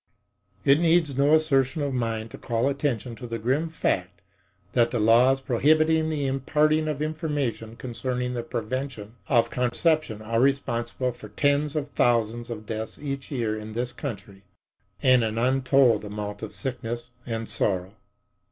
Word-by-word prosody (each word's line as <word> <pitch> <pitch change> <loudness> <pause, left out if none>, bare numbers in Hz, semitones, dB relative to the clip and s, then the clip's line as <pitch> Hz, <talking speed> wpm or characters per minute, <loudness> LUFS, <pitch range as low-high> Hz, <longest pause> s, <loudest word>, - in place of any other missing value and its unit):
It 140 +2 +6
needs 165 -4 +3
no 140 +3 +5
assertion 145 -2 +2
of 140 -1 -1
mine 115 -3 -2
to - - -10
call 120 +1 0
attention 135 -4 -1
to 125 - -7
the 115 0 -3
grim 135 +9 0
fact 95 - -2 0.5
that 120 -2 +3
the 120 - -1
laws 120 +5 +5
prohibiting 155 +5 +3
the 150 -3 -1
imparting 150 +4 +1
of 150 -1 -2
information 145 -8 -3
concerning 125 +1 -3
the 120 - -2
preventing 115 -1 -4 0.2
of 120 -3 +3
conception 125 -1 +1
are 115 +1 0
responsible 125 -2 0
for 120 - -12
tens 145 +1 +1
of 145 -2 -2
thousands 120 -2 +1
of 110 -2 -6
deaths 110 +1 -5
each 140 -2 -5
year 115 -6 -1
in 110 0 -7
this 120 +2 -3
country 100 -7 -7 0.6
and 130 -2 +5
an 110 0 -2
untold 130 -2 +3
amount 105 0 -5
of 110 - -6
sickness 120 -2 -5 0.2
and 115 -1 -3
sorrow. 95 -1 0
125 Hz, 150 wpm, -26 LUFS, 115-140 Hz, 0.6 s, It